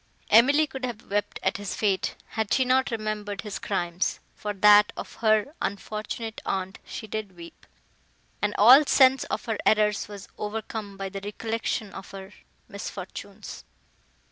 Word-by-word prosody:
Emily 280 +7 +6
could 265 -2 -9
have 240 -5 -5
wept 205 0 -1
at - - +1
his 200 -1 -5
fate, 200 -3 0
had 220 -2 -3
she 260 - +3
not 260 +1 +3
remembered 215 -2 -3
his 210 -2 -6
crimes; 175 +2 -1
for 210 - -4
that 205 +1 +6
of - - -7
her 220 +4 +2
unfortunate 215 +2 -4
aunt 190 0 -3
she - - -7
did 215 -3 -5
weep, 170 0 -13 0.7
and 210 0 0
all 250 +8 +9
sense 265 -1 +5
of - - -4
her 225 -3 -2
errors 210 -1 +2
was 205 -1 -10
overcome 210 -1 -5
by 195 0 -4
the 195 +1 -6
recollection 220 0 -3
of 190 - -9
her 195 +1 -10 0.3
misfortunes. 200 +1 -8
210 Hz, 150 wpm, -26 LUFS, 200-225 Hz, 0.7 s, all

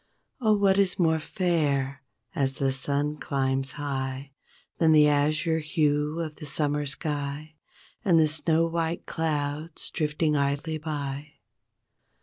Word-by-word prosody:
Oh 215 -4 +3
what 195 -1 +3
is 195 -2 +2
more 160 -3 +2
fair 145 -7 0 0.3
as 135 -5 0
the 135 0 0
sun 145 +3 0
climbs 135 -2 -1
high 135 -1 -4 0.5
Than 160 -1 +5
the 150 -1 +7
azure 155 +3 +2
hue 150 0 0
of 155 -2 -5
the 155 - -8
summer 145 0 0
sky 145 +1 -4 0.5
And 175 -6 +4
the 155 - +5
snow 160 +2 +3
white 165 0 -2
clouds 155 0 -2
drifting 150 0 0
idly 145 +3 -1
by? 145 -1 -5
150 Hz, 130 wpm, -27 LUFS, 140-160 Hz, 0.5 s, the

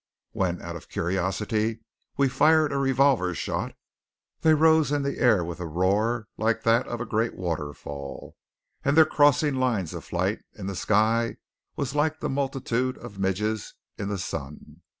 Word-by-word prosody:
When, 90 -2 -1
out 85 0 -6
of 85 - -10
curiosity, 105 +5 -1 0.4
we 140 - +4
fired 155 +3 +3
a - - 0
revolver 135 -9 +2
shot, - - -3 0.6
they 160 -1 +5
rose 160 -2 +4
in 145 -1 +1
the 140 - -3
air 110 -9 +4
with 85 +1 -6
a 90 - -4
roar 100 +7 +1
like 115 +1 0
that 115 +2 +3
of 120 - -4
a 120 - -3
great 110 +1 -1
waterfall, 75 -5 -5 0.5
and 140 +2 +2
their 160 - +9
crossing 145 -1 +3
lines 115 -10 0
of - - -6
flight - - -1
in - - -8
the 100 0 -3
sky 110 +5 +2 0.4
was 140 -1 -3
like 155 +2 +1
the - - -2
multitude 130 -2 -1
of 100 - -10
midges 105 +3 -1 0.2
in 100 - -4
the 100 - -2
sun. 75 -5 -7
115 Hz, 165 wpm, -26 LUFS, 95-140 Hz, 0.6 s, their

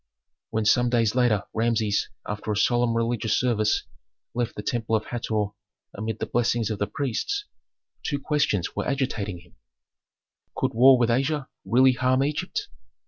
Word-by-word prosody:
When 110 -1 -1
some 120 +3 +4
days 115 -3 +2
later 120 -5 +2
Rameses, 110 -2 +1 0.2
after 105 +1 -3
a 105 - -1
solemn 120 +1 +2
religious 115 -2 +1
service, 110 -4 +1 0.5
left 120 -1 -2
the 105 - -6
temple 115 0 0
of 110 - -1
Hator 110 -4 -2 0.4
amid 110 +2 -4
the - - -3
blessings 120 -2 0
of 105 - -3
the 105 - 0
priests, 150 - -2 0.6
two 145 - -1
questions 140 - 0
were - - -2
agitating 110 -9 -2
him, 90 - -23 1.0
Could - - -1
war 130 +3 +7
with 120 -1 +2
Asia 135 +3 0 0.2
really 130 +6 +5
harm 130 +1 +2
Egypt? 145 +1 -2
115 Hz, 150 wpm, -25 LUFS, 110-130 Hz, 1.0 s, war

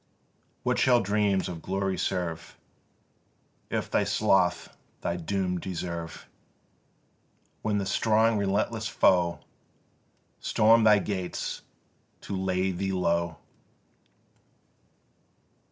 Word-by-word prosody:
What - - +1
shall 125 -2 +5
dreams 100 -2 +1
of 85 -2 -6
glory 95 +1 -1
serve, 85 -3 -3 1.1
If - - -3
thy - - +2
sloth 95 -4 +1 0.3
thy 85 - -1
doom 90 +1 -2
deserve, 85 -2 -6 1.3
When 105 -1 0
the 100 - -1
strong 110 +2 +2
relentless 105 +3 0
foe 90 -4 +2 1.0
Storm 115 +1 +4
thy 105 -1 +7
gates 95 -3 -3 0.6
to 100 - -5
lay 95 0 0
thee 95 +2 -2
low? 85 -3 0
95 Hz, 90 wpm, -27 LUFS, 90-105 Hz, 1.3 s, thy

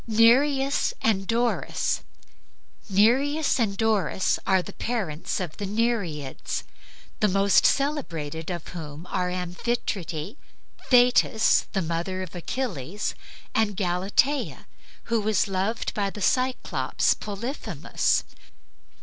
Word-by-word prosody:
NEREUS 270 +5 +3
AND 195 -4 +1
DORIS 235 +1 0 0.9
Nereus 270 +10 +3
and 200 -4 0
Doris 215 -4 +1
were 190 -2 +3
the - - -9
parents 185 -8 -2
of 175 -5 -5
the 205 - -3
Nereids, 200 - -2 0.6
the 210 - +4
most 195 0 +4
celebrated 165 - -1
of 175 -3 -5
whom 155 -3 -7
were 180 -2 0
Amphitrite, 180 - -3 0.5
Thetis, 245 -3 +4
the 190 -3 0
mother 170 +3 -2
of 180 - -9
Achilles, 185 - -3 0.4
and 210 -3 +1
Galatea, 195 +10 0 0.4
who 230 -2 0
was 215 -1 +1
loved 195 +4 -1
by 200 -2 0
the 210 - -9
Cyclops 255 +5 +1
Polyphemus. 225 +7 -2
205 Hz, 105 wpm, -26 LUFS, 180-235 Hz, 0.9 s, the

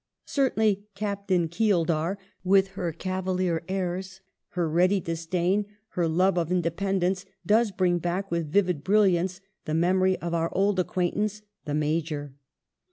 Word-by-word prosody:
Certainly 220 -7 +1
" 200 - -49
Captain 200 -4 0
Keeldar," 170 -1 +1 0.3
with 195 +1 +4
her 180 -3 -3
cavalier 185 -1 -1
airs, 190 0 -3 0.4
her 175 -2 +2
ready 180 +5 +3
disdain, 175 +4 -1 0.2
her 175 -2 0
love 180 +3 +2
of 170 0 -2
independence, 185 +2 0 0.2
does 225 +2 +4
bring 180 -2 +1
back 175 +3 -2
with 165 -3 -1
vivid 180 -5 +2
brilliance 190 -2 +2 0.2
the 155 -2 -1
memory 185 +2 +3
of 170 0 -4
our 165 0 +1
old 195 0 +2
acquaintance, 205 +4 -1 0.2
"the 145 -1 -2
Major." 150 -2 -1
185 Hz, 135 wpm, -26 LUFS, 170-195 Hz, 0.4 s, with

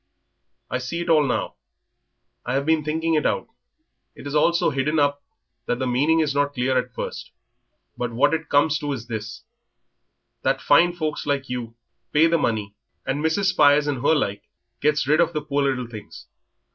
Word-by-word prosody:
I 125 - -2
see 130 +7 -4
it 170 - -5
all 155 -2 +5
now; 130 -4 -1 0.9
I 125 - -2
have 140 +1 0
been 160 -1 +2
thinking 160 +2 -1
it 155 -1 +2
out. - - 0 0.7
It - - -12
is 145 - -5
all 150 +3 +4
so 170 -2 +1
hidden 140 +3 0
up 145 -1 +1 0.5
that 120 - 0
the 130 - -2
meaning 145 +6 +2
is 150 -3 0
not 145 0 0
clear 130 +1 0
at 125 -1 -1
first, - - -6 0.7
but 120 -1 -3
what 120 +6 +2
it 160 -1 -2
comes 145 +1 +3
to 145 - -3
is 115 -4 -6
this, 110 -3 -6 1.0
that - - +1
fine 175 0 +4
folks 155 -4 -4
like 140 -2 -1
you 120 -2 -5 0.4
pays 160 +2 +4
the 170 - +3
money, 105 -6 -1 0.3
and 140 +3 -2
Mrs. 190 +5 +2
Spires 145 -3 +4
and 140 -4 -2
her 150 +4 +3
like 100 -8 -1 0.4
gets 150 -1 +1
rid 155 +3 +4
of 170 0 +1
the 150 - -2
poor 145 -1 -1
little 130 -2 -1
things. 110 -3 -11
145 Hz, 190 wpm, -23 LUFS, 125-155 Hz, 1.0 s, all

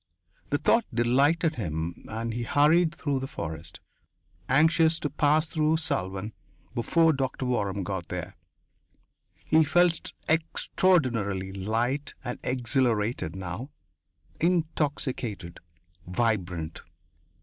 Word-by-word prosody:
The 145 - +2
thought 230 +9 +3
delighted 140 +8 +2
him 85 -4 -4
and 115 +1 -3
he 120 - -3
hurried 155 +7 +3
through 145 -5 -1
the 135 - -4
forest, 80 - -6 0.7
anxious 160 +3 +4
to 145 - -2
pass 150 +2 +2
through 155 -1 +1
Salvan 100 - -2 0.4
before 160 +7 +3
Doctor 135 0 -2
Waram 100 -6 -1
got 95 -2 -4
there. 90 -2 -5 1.1
He 160 0 +5
felt 175 +2 +2
extraordinarily 130 - +1
light 115 +8 -2
and 120 - -5
exhilarated 120 - 0
now, 95 - -5 0.7
intoxicated, 145 - -1 0.5
vibrant. 90 -6 -1
125 Hz, 100 wpm, -27 LUFS, 100-155 Hz, 1.1 s, He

